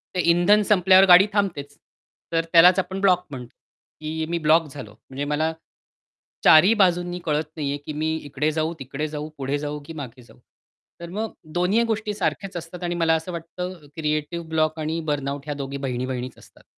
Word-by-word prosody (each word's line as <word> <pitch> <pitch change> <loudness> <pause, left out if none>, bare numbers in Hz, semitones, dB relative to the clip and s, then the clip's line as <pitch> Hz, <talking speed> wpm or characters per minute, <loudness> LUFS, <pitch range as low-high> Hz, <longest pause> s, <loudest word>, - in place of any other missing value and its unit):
ते - - -1
इंधन 175 +5 +4
संपल्यावर 190 -1 +6
गाडी 180 +2 +8
थांबतेच. 165 -9 -2 0.5
तर 165 0 0
त्यालाच 180 +2 +7
आपण 190 +1 -3
ब्लॉक 180 -2 +3
म्हणतो. 125 -2 -9 0.5
की 160 +1 -3
मी 170 - -1
ब्लॉक 160 0 +3
झालो. 130 -7 -9 0.2
म्हणजे 135 +2 -4
मला 150 +2 0 0.9
4 155 -1 +8
ही 200 +5 +4
बाजूंनी 180 -4 +1
कळत 150 0 -1
नाहीये 145 -2 -2
की 155 - -5
मी 155 +1 -1
इकडे 150 +2 -1
जाऊ, 155 +1 -1
तिकडे 135 +3 -4
जाऊ, 150 0 -6
पुढे 140 +1 -2
जाऊ, 150 0 -4
की 165 - -9
मागे 130 -5 -8
जाऊ. - - -20 0.6
तर 170 - -7
मग 215 +4 -4 0.2
दोन्हीही 180 +6 +2
गोष्टी 220 -2 -2
सारख्याच 195 -2 -3
असतात 170 +1 -8
आणि 175 0 -2
मला 165 -1 +2
असं 160 +3 -4
वाटतं 180 +2 -6 0.2
क्रिएटिव्ह 155 +2 -2
ब्लॉक 155 0 0
आणि 155 +2 -2
बर्नआउट 140 -1 -3
ह्या 150 - -3
दोघी 140 0 -5
बहिणी-बहिणीच 130 -1 -4
असतात. - - -19
160 Hz, 180 wpm, -23 LUFS, 145-180 Hz, 0.9 s, गाडी